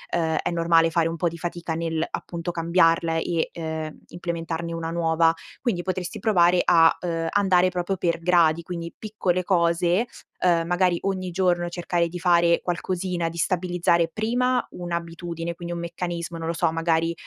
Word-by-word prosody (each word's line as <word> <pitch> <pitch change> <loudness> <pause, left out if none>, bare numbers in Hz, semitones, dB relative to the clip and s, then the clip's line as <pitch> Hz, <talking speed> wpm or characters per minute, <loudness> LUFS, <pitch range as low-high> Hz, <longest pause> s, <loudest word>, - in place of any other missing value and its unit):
uhm, 160 -2 +1
è - - 0
normale 165 -1 +3
fare 165 0 +2
un 165 - -5
po' 175 - +1
di 170 0 -4
fatica 170 -1 -4
nell'appunto 165 +1 -3
cambiarla 165 -1 +2
e, 165 0 -1
ehm, 160 -2 -5
implementarne 170 -1 -4
una 165 -1 -3
nuova. 165 -1 +2 0.3
Quindi 215 -9 0
potresti 185 -2 -3
provare 180 -4 +4
a, 165 -1 +5
uhm, 165 -2 -2
andare 185 -3 +3
proprio 180 +1 -2
per 170 -1 0
gradi, 170 -2 +3
quindi 170 -1 -6
piccole 190 -4 -1
cose, 175 +3 +2 0.3
uhm, 170 -2 +2
magari 180 0 +2
ogni 185 -2 -2
giorno 175 -1 +1
cercare 170 -1 -1
di 175 +1 -7
fare 170 -1 +3
qualcosina, 180 0 -2
di 170 +1 -6
stabilizzare 175 -1 +1
prima 245 +6 0
1 175 -1 -4
abitudine, 170 0 -5
quindi 175 0 -6
un 170 - -4
meccanismo; 170 0 -4
non 165 0 -5
lo 165 - 0
so, 165 -1 +1
magari, 165 0 +1
170 Hz, 165 wpm, -24 LUFS, 165-180 Hz, 0.3 s, a